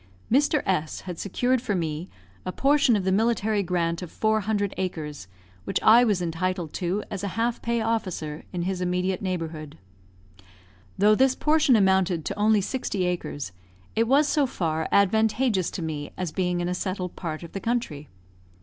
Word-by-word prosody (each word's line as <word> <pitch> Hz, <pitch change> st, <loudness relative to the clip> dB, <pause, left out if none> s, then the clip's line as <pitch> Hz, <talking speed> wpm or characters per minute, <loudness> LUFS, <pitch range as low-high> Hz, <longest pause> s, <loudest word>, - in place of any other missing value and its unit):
Mr. 290 Hz, +3 st, +3 dB
S 160 Hz, -5 st, -1 dB
had 180 Hz, -3 st, -7 dB
secured 245 Hz, +5 st, 0 dB
for 210 Hz, -5 st, -1 dB
me 160 Hz, 0 st, -3 dB, 0.3 s
a 185 Hz, -, -3 dB
portion 275 Hz, 0 st, +3 dB
of 200 Hz, -, 0 dB
the 190 Hz, -, +1 dB
military 220 Hz, 0 st, +2 dB
grant 170 Hz, -2 st, -1 dB
of 175 Hz, -3 st, -7 dB
four 220 Hz, 0 st, +1 dB
hundred 205 Hz, -1 st, -1 dB
acres, 155 Hz, -, -4 dB, 0.4 s
which -, -, -1 dB
I 230 Hz, +3 st, +7 dB
was 205 Hz, -6 st, +1 dB
entitled 170 Hz, 0 st, -2 dB
to 185 Hz, +4 st, -1 dB
as 200 Hz, -1 st, -4 dB
a -, -, -1 dB
half 230 Hz, +1 st, 0 dB
pay 235 Hz, 0 st, 0 dB
officer, 185 Hz, -9 st, -2 dB
in 175 Hz, -2 st, -3 dB
his 185 Hz, 0 st, -2 dB
immediate 180 Hz, +1 st, 0 dB
neighbourhood. 165 Hz, -, -4 dB, 1.2 s
Though 210 Hz, +2 st, +5 dB
this 260 Hz, +3 st, +3 dB
portion 305 Hz, -4 st, +3 dB
amounted 190 Hz, -5 st, +2 dB
to -, -, -3 dB
only 210 Hz, 0 st, +3 dB
sixty 200 Hz, -4 st, -2 dB
acres, 170 Hz, -, -3 dB, 0.4 s
it 225 Hz, +1 st, +2 dB
was 285 Hz, +4 st, +4 dB
so 290 Hz, -2 st, +2 dB
far 160 Hz, -7 st, -2 dB
advantageous 220 Hz, 0 st, +2 dB
to 175 Hz, -, -5 dB
me 150 Hz, -2 st, -4 dB
as 180 Hz, -4 st, -3 dB
being 180 Hz, 0 st, -1 dB
in 175 Hz, -, -1 dB
a 180 Hz, -, -1 dB
settled 185 Hz, -1 st, -3 dB
part 160 Hz, -2 st, -5 dB
of 170 Hz, -, -9 dB
the 195 Hz, -, -4 dB
country. 195 Hz, -, -2 dB
190 Hz, 175 wpm, -25 LUFS, 175-220 Hz, 1.2 s, I